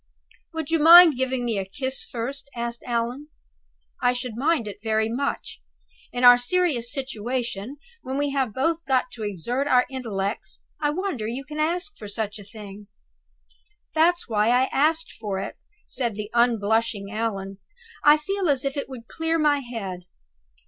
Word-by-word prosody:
"Would 320 -1 -3
you 330 - +3
mind 330 0 +9
giving 260 -1 -1
one 225 -4 0
a - - -1
kiss 260 +7 -3
first?" 270 +4 -5
asked 235 0 -4
Allan. 240 +4 -2 0.7
"I 245 0 +3
should 245 -2 -4
mind 275 -2 +1
it 205 0 -8
very 220 0 +1
much. 275 +5 -3 0.5
In 245 - -3
our 245 0 +9
serious 250 -4 +1
situation, 250 -2 -3 0.2
when 265 +1 -4
we 285 0 0
have 265 -4 0
both 325 +8 0
got 255 -2 +1
to 230 - -10
exert 235 - -2
our 250 -3 +4
intellects, 215 -6 -4 0.2
I 295 - +2
wonder 300 - -2
you 245 +4 -4
can 300 +2 -7
ask 355 +6 0
for 210 - -7
such 210 0 -3
a - - -10
thing!" 205 0 -11 1.1
"That's 340 +2 +3
why 215 -2 +1
I 250 +2 +3
asked 315 +3 +1
for 205 -3 -3
it," - - -5 0.3
said 235 -5 -2
the 210 0 -6
unblushing 225 -3 +1
Allan. 200 -3 -3 0.4
"I 295 +1 +7
feel 385 +3 -2
as 275 -1 +1
if 275 - -1
it 280 -2 -4
would 240 -4 -9
clear 325 0 -1
my 295 -2 +3
head." 200 -8 -6
245 Hz, 165 wpm, -24 LUFS, 220-290 Hz, 1.1 s, mind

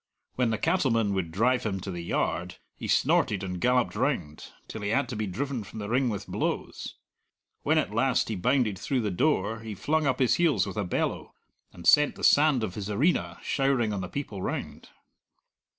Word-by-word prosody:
When 125 -2 +1
the 110 - 0
cattlemen 115 - +1
would 95 -4 -1
drive 125 +7 +2
him 95 -3 -2
to 95 - -5
the 85 -1 -5
yard, 90 +1 -2 0.2
he - - -6
snorted 100 -2 +2
and 90 -2 -4
galloped 125 0 +2
round, 105 - -2 0.2
till 110 - -7
he 100 - -2
had 135 +6 +1
to 125 - -4
be 110 0 -2
driven 125 +5 -3
from 100 - -11
the 105 -1 -5
ring 125 +1 +2
with 105 -2 -4
blows. - - -3 0.7
When - - +2
at - - 0
last - - +2
he 110 - -2
bounded 110 0 +1
through 130 -3 -1
the 105 -3 -1
door, 110 - +1
he 110 -2 -7
flung 150 +8 0
up 130 -2 +1
his 130 -3 +3
heels 150 - +3
with 100 -1 -6
a 105 - 0
bellow, 90 - -2 0.4
and 85 - -12
sent 150 0 +5
the - - -10
sand 145 -5 +5
of 100 -5 -3
his 100 0 -5
arena 140 - +1
showering 135 -6 +1
on 100 - -3
the 90 - -5
people 110 -9 -5
round. - - -5
110 Hz, 200 wpm, -27 LUFS, 95-130 Hz, 0.7 s, sent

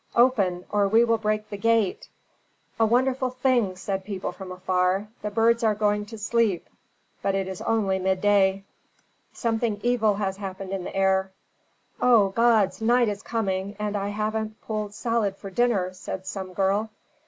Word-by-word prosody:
"Open, 200 -8 +3
or 205 -1 +2
we 225 +4 +5
will 230 -1 +2
break 215 0 -1
the 205 - -4
gate!" 225 -2 +1 0.7
"A 225 - +5
wonderful 255 +2 +1
thing," 250 -6 +1
said 190 +1 -3
people 195 -3 -4
from 185 +1 -9
afar; 185 +2 0
"the 210 - -3
birds 230 +2 +2
are 215 -2 +3
going 210 0 0
to 225 - -9
sleep. 215 -3 0 0.5
But 195 - 0
it 195 -1 -1
is 190 -1 -6
only 200 -4 +1
midday." 190 +1 +2 0.7
"Something 225 -3 -1
evil 235 -4 +2
has 195 -1 -2
happened 195 -1 -6
in 190 -2 -3
the - - -7
air!" 190 0 +2 0.7
"O 230 -6 +5
gods, 220 -2 +2
night 240 +1 +3
is 205 0 -4
coming, 200 -3 -2
and 210 0 -3
I 200 0 -1
haven't 215 +1 -3
pulled 210 -2 -4
salad 230 -5 -1
for 195 - -9
dinner," 195 -4 +1
said 185 0 -7
some 190 -1 -6
girl. 200 +3 +1
205 Hz, 165 wpm, -25 LUFS, 190-225 Hz, 0.7 s, we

